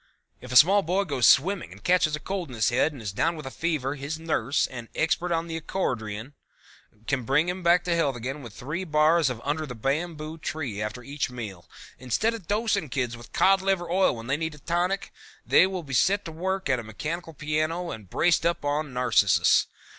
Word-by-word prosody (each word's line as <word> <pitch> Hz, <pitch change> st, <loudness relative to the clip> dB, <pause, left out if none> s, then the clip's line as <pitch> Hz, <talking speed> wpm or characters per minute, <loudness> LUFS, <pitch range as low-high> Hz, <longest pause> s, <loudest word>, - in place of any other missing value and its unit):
If 125 Hz, -, -10 dB
a -, -, -3 dB
small 195 Hz, +9 st, +7 dB
boy 185 Hz, +3 st, 0 dB
goes 140 Hz, -, +2 dB
swimming 185 Hz, +9 st, +3 dB
and -, -, -14 dB
catches 175 Hz, -4 st, +3 dB
a -, -, -7 dB
cold 185 Hz, -1 st, -4 dB
in 125 Hz, -, -8 dB
his 110 Hz, 0 st, +2 dB
head 125 Hz, +5 st, +2 dB
and 135 Hz, -6 st, -10 dB
is 100 Hz, -, -3 dB
down 165 Hz, -, 0 dB
with 155 Hz, -, -8 dB
a 130 Hz, -, -6 dB
fever, 150 Hz, -5 st, -1 dB
his 145 Hz, +2 st, -5 dB
nurse, 155 Hz, -5 st, 0 dB
an 120 Hz, -3 st, -8 dB
expert 170 Hz, +3 st, 0 dB
on 165 Hz, 0 st, 0 dB
the 165 Hz, -1 st, -4 dB
accordeon, 120 Hz, -, -3 dB, 0.7 s
can 140 Hz, 0 st, 0 dB
bring 140 Hz, +8 st, +2 dB
him 180 Hz, +1 st, -3 dB
back 175 Hz, +1 st, +4 dB
to 175 Hz, -1 st, 0 dB
health 145 Hz, -6 st, +1 dB
again 130 Hz, +5 st, -5 dB
with 120 Hz, -4 st, -9 dB
three 150 Hz, -, -5 dB
bars 155 Hz, -1 st, +3 dB
of 125 Hz, -3 st, -4 dB
Under 150 Hz, +2 st, -2 dB
the 125 Hz, -, -7 dB
Bamboo 155 Hz, +5 st, -3 dB
Tree 140 Hz, -11 st, -4 dB
after 110 Hz, +4 st, -4 dB
each 140 Hz, +1 st, -3 dB
meal. 105 Hz, -8 st, -8 dB, 0.3 s
Instead 130 Hz, -, 0 dB
of 220 Hz, -7 st, -8 dB
dosing 205 Hz, -6 st, 0 dB
kids 125 Hz, -2 st, -2 dB
with 120 Hz, -1 st, -13 dB
cod 195 Hz, 0 st, +4 dB
liver 190 Hz, -3 st, 0 dB
oil 190 Hz, -4 st, +3 dB
when 115 Hz, 0 st, -8 dB
they 135 Hz, +3 st, 0 dB
need 160 Hz, -1 st, -3 dB
a -, -, -14 dB
tonic, 175 Hz, +6 st, -1 dB, 0.3 s
they 185 Hz, -, +5 dB
will 185 Hz, -2 st, -4 dB
be 140 Hz, -3 st, -8 dB
set 200 Hz, +10 st, +2 dB
to 165 Hz, -, -6 dB
work 190 Hz, +4 st, -2 dB
at 130 Hz, -3 st, +1 dB
a -, -, -6 dB
mechanical 160 Hz, +10 st, -5 dB
piano 155 Hz, +4 st, -1 dB
and 105 Hz, -4 st, -9 dB
braced 170 Hz, -, +2 dB
up 170 Hz, -3 st, 0 dB
on 145 Hz, -1 st, -1 dB
Narcissus. 120 Hz, -6 st, +3 dB
155 Hz, 215 wpm, -26 LUFS, 125-175 Hz, 0.7 s, small